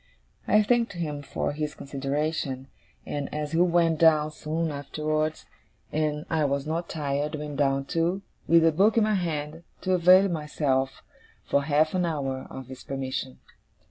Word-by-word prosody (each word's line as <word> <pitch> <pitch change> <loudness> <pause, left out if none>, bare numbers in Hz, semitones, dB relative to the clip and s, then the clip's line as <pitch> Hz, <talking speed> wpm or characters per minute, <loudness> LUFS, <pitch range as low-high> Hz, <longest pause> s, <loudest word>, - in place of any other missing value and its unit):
I 215 0 +5
thanked 235 +1 +2
him 155 -5 -4
for 145 - -2
his 150 0 -4
consideration; 140 -1 -3 0.4
and, 145 -1 -4
as 150 0 -3
he 165 - +1
went 170 -2 +3
down 155 -2 +5
soon 160 +1 -2
afterwards, 155 +2 -2 0.5
and 150 0 -1
I 160 -2 +1
was 140 0 -1
not 165 +2 -3
tired, 145 0 -2
went 150 -1 -5
down 135 -1 +1
too, 175 +5 0 0.2
with 165 0 +6
a 165 - +5
book 200 +8 +3
in 225 - +5
my 215 0 +2
hand, 160 -4 -2 0.2
to 185 - 0
avail 185 +2 +6
myself, 150 -5 -1 0.4
for 140 - +2
half 155 +1 +2
an 180 -2 +1
hour, 135 -5 -3
of 130 0 -8
his 130 +1 -10
permission. 130 -1 -4
155 Hz, 160 wpm, -27 LUFS, 140-165 Hz, 0.5 s, with